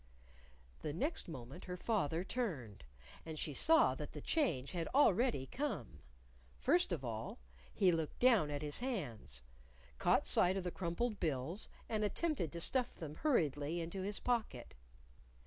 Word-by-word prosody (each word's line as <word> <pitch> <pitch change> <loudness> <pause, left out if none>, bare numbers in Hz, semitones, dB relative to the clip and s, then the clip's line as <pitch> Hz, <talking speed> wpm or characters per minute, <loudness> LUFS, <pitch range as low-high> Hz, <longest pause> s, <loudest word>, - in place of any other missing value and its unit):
The 150 - -3
next 290 - 0
moment 135 +1 -8
her 180 -1 -5
father 175 -6 0
turned. 145 - -4 0.4
And 160 -1 -7
she 150 - -2
saw 320 - +6
that - - -7
the - - -6
change 160 - 0
had 170 -3 -2
already 240 - +4
come. 195 - -4 0.6
First 60 - +2
of - - -2
all, - - -4 0.3
he 190 -4 +4
looked 160 -2 -2
down 230 -11 +5
at 145 0 -3
his 145 -1 +1
hands, 130 - -4 0.6
caught - - +3
sight 185 +2 +4
of 190 - -2
the 180 - -2
crumpled 195 +6 -2
bills, 155 - -2 0.2
and 215 -1 -1
attempted 210 - 0
to 170 - -4
stuff 250 +8 +1
them 155 -4 -7
hurriedly 155 - +1
into 170 +3 -4
his 200 +2 -2
pocket. 220 - -2
175 Hz, 150 wpm, -37 LUFS, 145-235 Hz, 0.6 s, saw